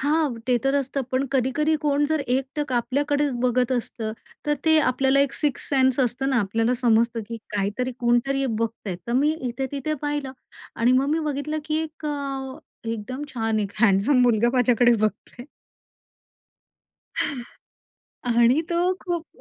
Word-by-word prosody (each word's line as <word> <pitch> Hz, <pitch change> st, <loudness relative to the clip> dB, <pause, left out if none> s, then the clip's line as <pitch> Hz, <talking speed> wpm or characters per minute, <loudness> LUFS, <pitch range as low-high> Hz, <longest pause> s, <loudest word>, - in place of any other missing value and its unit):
हां, 290 Hz, -3 st, +1 dB
ते 250 Hz, -1 st, +3 dB
तर 270 Hz, -, +2 dB
असतं. 275 Hz, 0 st, -1 dB
पण 265 Hz, +2 st, +1 dB
कधी-कधी 275 Hz, +4 st, +1 dB
कोण 290 Hz, 0 st, +2 dB
जर 315 Hz, -1 st, +1 dB
एक 260 Hz, +2 st, +1 dB
टक 295 Hz, -3 st, -2 dB
आपल्याकडेचं 280 Hz, +1 st, 0 dB
बघत 250 Hz, 0 st, +2 dB
असतं 225 Hz, -3 st, -3 dB, 0.3 s
तर 295 Hz, -, +2 dB
ते 315 Hz, -1 st, +5 dB
आपल्याला 265 Hz, +2 st, +2 dB
एक 280 Hz, -1 st, +1 dB
सिक्सथ 290 Hz, -1 st, -2 dB
सेन्स 260 Hz, -2 st, +3 dB
असतं 260 Hz, +2 st, 0 dB
ना 260 Hz, -, +2 dB
आपल्याला 225 Hz, +5 st, +1 dB
समजतं, 235 Hz, -1 st, +2 dB
की 230 Hz, -, -4 dB, 0.2 s
काहीतरी 205 Hz, +6 st, -1 dB
कोणतरी 250 Hz, +3 st, +1 dB
बघतंय, 220 Hz, -5 st, -3 dB
तर 235 Hz, -, -2 dB
मी 290 Hz, +5 st, +3 dB, 0.2 s
इथे 265 Hz, +3 st, -3 dB
तिथे 285 Hz, +2 st, -2 dB
पाहिलं 290 Hz, -2 st, -2 dB, 0.4 s
आणि 240 Hz, +1 st, +3 dB
मग 265 Hz, +2 st, +3 dB
मी 315 Hz, -, +2 dB
बघितलं, 295 Hz, +2 st, -3 dB
की 310 Hz, 0 st, -1 dB
एक 310 Hz, -1 st, -7 dB
अ, 275 Hz, -2 st, -4 dB, 0.3 s
एकदम 230 Hz, +5 st, -4 dB
छान 225 Hz, -2 st, 0 dB
एक 200 Hz, -1 st, -3 dB
हँडसम 225 Hz, +5 st, +4 dB
मुलगा 235 Hz, -1 st, +3 dB
माझ्याकडे 245 Hz, -1 st, +4 dB
बघतोय. 215 Hz, +3 st, -3 dB, 2.8 s
आणि 240 Hz, +4 st, +4 dB
तो 350 Hz, +2 st, +2 dB
खूप 345 Hz, -2 st, -3 dB
260 Hz, 150 wpm, -24 LUFS, 235-285 Hz, 2.8 s, ते